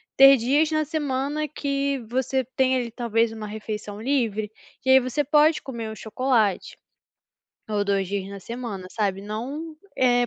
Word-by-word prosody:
ter 275 Hz, 0 st, +9 dB
dias 280 Hz, +6 st, +2 dB
na 310 Hz, 0 st, +1 dB
semana 295 Hz, 0 st, -1 dB
que 280 Hz, -1 st, -1 dB
você 260 Hz, +2 st, 0 dB
tenha, 260 Hz, 0 st, +3 dB
ali, 235 Hz, -2 st, -4 dB
talvez 230 Hz, -1 st, +1 dB
1 220 Hz, -1 st, -6 dB
refeição 210 Hz, -1 st, -6 dB
livre, 225 Hz, -5 st, 0 dB, 0.3 s
e -, -, 0 dB
aí, 265 Hz, -, +9 dB
você 255 Hz, +3 st, -1 dB
pode 300 Hz, +2 st, +4 dB
comer 235 Hz, -4 st, -6 dB
um 220 Hz, -, -7 dB
chocolate, 220 Hz, -3 st, 0 dB, 0.9 s
ou 210 Hz, -1 st, 0 dB
2 195 Hz, -2 st, 0 dB
dias 195 Hz, -1 st, -3 dB
na 200 Hz, 0 st, -8 dB
semana 230 Hz, -4 st, -6 dB
sabe, 195 Hz, -3 st, -1 dB
não, 265 Hz, +10 st, -5 dB, 0.2 s
eh, 245 Hz, -1 st, +3 dB
245 Hz, 160 wpm, -24 LUFS, 215-275 Hz, 0.9 s, ter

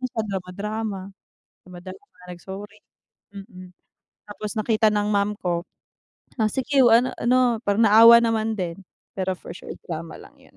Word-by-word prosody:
na 255 Hz, -, -2 dB
siya 220 Hz, -, -2 dB
drama-drama, 200 Hz, +2 st, -5 dB, 0.6 s
drama-drama 185 Hz, +6 st, -12 dB, 0.2 s
nag-sorry, 195 Hz, +4 st, -10 dB, 0.5 s
mm. 190 Hz, -2 st, -11 dB, 0.6 s
Tapos 210 Hz, 0 st, -7 dB
nakita 215 Hz, 0 st, +1 dB
ng 210 Hz, 0 st, 0 dB
ma'am 205 Hz, 0 st, +1 dB
ko, 175 Hz, 0 st, -2 dB, 0.8 s
"Ah, 215 Hz, -, +2 dB
sige 265 Hz, 0 st, +2 dB
ano 245 Hz, +2 st, +3 dB
ano" 245 Hz, -1 st, +2 dB
parang 205 Hz, +3 st, +2 dB
naawa 230 Hz, +2 st, +8 dB
naman 225 Hz, -1 st, 0 dB
din, 175 Hz, 0 st, -4 dB, 0.3 s
pero 190 Hz, -1 st, -2 dB
for -, -, -10 dB
sure -, -, -10 dB
drama 165 Hz, -1 st, -7 dB
lang -, -, -15 dB
yun. -, -, -23 dB
205 Hz, 140 wpm, -23 LUFS, 185-225 Hz, 0.8 s, naawa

